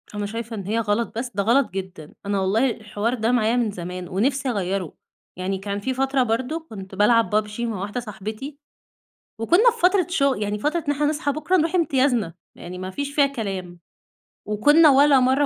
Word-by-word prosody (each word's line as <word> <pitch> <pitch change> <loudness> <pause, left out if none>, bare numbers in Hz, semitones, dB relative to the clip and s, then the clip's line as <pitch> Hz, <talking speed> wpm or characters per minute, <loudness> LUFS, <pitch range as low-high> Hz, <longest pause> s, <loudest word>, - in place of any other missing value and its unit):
أنا 205 0 -2
شايفة 225 +2 -5
إن 200 - -5
هي 220 +2 0
غلط 225 +1 -1
بس؟! 240 +1 -3
ده 200 - +1
غلط 245 +5 +3
جدًا، 185 -5 -7
أنا 200 0 0
والله 210 +7 +2
الحوار 215 +1 -3
ده 230 -1 0
معايا 235 -1 +2
من 235 -4 +1
زمان 180 -1 -6
ونفسي 260 +8 0
أغيره، 195 - -2 0.4
يعني 190 +1 -2
كان 200 +1 -4
في 260 +6 -2
فترة 270 0 +1
برضه 260 +8 -2
كنت 195 -2 -9
بالعب 225 +3 +3
PUBG 210 +1 -1
مع 230 -5 -2
واحدة 205 +5 -3
صاحبتي، 220 +5 -7 0.8
وكنا 350 - +5
في 470 0 -10
فترة 365 -1 +3
شغ 280 -7 +2
يعني 210 0 -2
فترة 305 +8 -1
إن - - +3
إحنا 295 +1 0
نصحى 295 -1 0
بكره 310 +6 0
نروح 330 0 +1
امتيازنا، 265 - +1 0.2
يعني 180 +1 -9
ما 185 0 -5
فيش 285 +7 -5
فيها 285 -1 +5
كلام، 195 -9 -5 0.7
وكنا 295 +10 +5
ولا 280 0 +6
مرة 260 +3 +3
230 Hz, 190 wpm, -23 LUFS, 200-280 Hz, 0.8 s, ولا